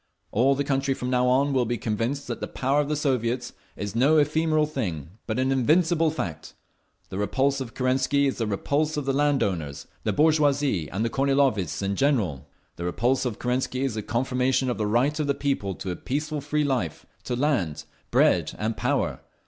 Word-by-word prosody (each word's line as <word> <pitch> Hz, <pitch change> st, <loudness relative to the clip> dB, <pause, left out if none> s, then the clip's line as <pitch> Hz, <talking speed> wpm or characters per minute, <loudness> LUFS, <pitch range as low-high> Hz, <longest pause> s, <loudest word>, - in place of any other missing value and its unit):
All 130 Hz, +5 st, +3 dB
the 140 Hz, -, 0 dB
country 135 Hz, -1 st, 0 dB
from 125 Hz, 0 st, -4 dB
now 125 Hz, 0 st, +2 dB
on 135 Hz, +3 st, +3 dB
will 130 Hz, -2 st, +2 dB
be 120 Hz, +1 st, -1 dB
convinced 115 Hz, +6 st, -2 dB
that 120 Hz, -, -5 dB
the -, -, -2 dB
Power 135 Hz, +3 st, +1 dB
of 145 Hz, -, -3 dB
the 150 Hz, -, +1 dB
Soviets 125 Hz, -4 st, -1 dB, 0.2 s
is 105 Hz, +1 st, -5 dB
no 140 Hz, +7 st, +4 dB
ephemeral 155 Hz, +1 st, +2 dB
thing, 90 Hz, -, -4 dB, 0.2 s
but 110 Hz, -, -2 dB
an 130 Hz, +1 st, +1 dB
invincible 160 Hz, +5 st, +3 dB
fact…. 80 Hz, -, -5 dB, 0.5 s
The 95 Hz, -, -5 dB
repulse 135 Hz, +7 st, +1 dB
of 115 Hz, -4 st, -7 dB
Kerensky 130 Hz, +2 st, +2 dB
is 135 Hz, -, -1 dB
the 115 Hz, -, 0 dB
repulse 145 Hz, +9 st, 0 dB
of 145 Hz, -, -2 dB
the 135 Hz, -, +1 dB
land 145 Hz, 0 st, +2 dB
owners, 75 Hz, -7 st, -3 dB, 0.2 s
the -, -, +1 dB
bourgeoisie 145 Hz, -, +2 dB
and 105 Hz, +5 st, -2 dB
the 115 Hz, -, -1 dB
Kornilovists 135 Hz, -, +1 dB
in 100 Hz, 0 st, -1 dB
general. 105 Hz, -, 0 dB, 0.3 s
The 85 Hz, -, -4 dB
repulse 120 Hz, +10 st, +1 dB
of 120 Hz, -4 st, -2 dB
Kerensky 125 Hz, +1 st, -1 dB
is 135 Hz, -4 st, 0 dB
the 110 Hz, -, -3 dB
confirmation 125 Hz, +3 st, 0 dB
of 120 Hz, -, -4 dB
the 105 Hz, -, 0 dB
right 130 Hz, +8 st, +1 dB
of 150 Hz, -, 0 dB
the 140 Hz, -, +1 dB
people 135 Hz, -10 st, -1 dB
to 95 Hz, -, -5 dB
a -, -, -3 dB
peaceful 150 Hz, -, -3 dB
free 150 Hz, +2 st, 0 dB
life, 125 Hz, -, -2 dB, 0.2 s
to 125 Hz, -, -1 dB
land, 120 Hz, -, 0 dB, 0.3 s
bread -, -, +3 dB
and 110 Hz, +1 st, -2 dB
power. -, -, 0 dB
130 Hz, 195 wpm, -25 LUFS, 110-140 Hz, 0.5 s, no